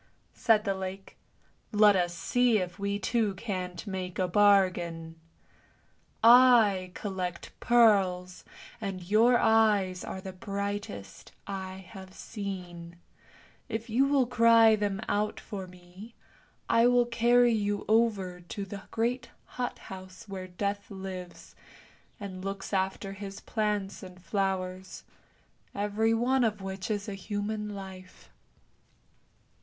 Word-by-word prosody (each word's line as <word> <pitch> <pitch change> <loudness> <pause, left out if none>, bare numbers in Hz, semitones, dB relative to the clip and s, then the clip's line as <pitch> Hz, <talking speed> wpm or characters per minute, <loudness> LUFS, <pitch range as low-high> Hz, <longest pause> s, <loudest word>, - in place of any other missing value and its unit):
" - - -40
said 225 -3 +3
the 200 -2 0
lake. 190 0 -7 0.3
" - - -35 0.2
Let 210 -1 +6
us 175 -2 0
see 245 +5 +2
if 180 -2 -4
we 200 0 -1
two 210 -1 0
can't 185 -3 -5
make 185 -3 -5
a 185 - +1
bargain! 175 -4 +2 1.1
I 230 -6 +6
collect 185 -4 -5
pearls, 190 -6 +3 0.4
and 195 -3 -4
your 225 +6 +4
eyes 210 -5 +3
are 190 - -6
the 190 0 -8
brightest 200 - -6
I 190 -1 -6
have 190 -1 -12
seen; 180 -5 -7 0.7
if 225 0 -4
you 265 +5 +3
will 275 -2 +3
cry 230 -2 +5
them 205 -1 -2
out 210 +1 -1
for 195 -3 -7
me, 180 +5 -14 0.5
I 230 +1 +4
will 245 0 +4
carry 240 0 +3
you 205 -2 -1
over 210 -5 +1
to 195 +3 -6
the 195 0 -8
great 240 +3 -1 0.2
hot 245 -1 -4
house 185 +1 -11
where 190 -2 -6
Death 200 +3 -3
lives, 190 -2 -8 0.7
and 190 -3 -7
looks 195 +1 -5
after 195 +1 -1
his 195 0 -8
plants 210 -3 -2
and 180 -1 -11
flowers, 190 0 -3 0.7
every 210 +3 +1
one 255 +3 +2
of 215 -2 0
which 190 +1 -6
is 205 -1 -2
a 205 - -4
human 205 +1 -4
life." 190 -2 -11
200 Hz, 130 wpm, -29 LUFS, 185-220 Hz, 1.1 s, Let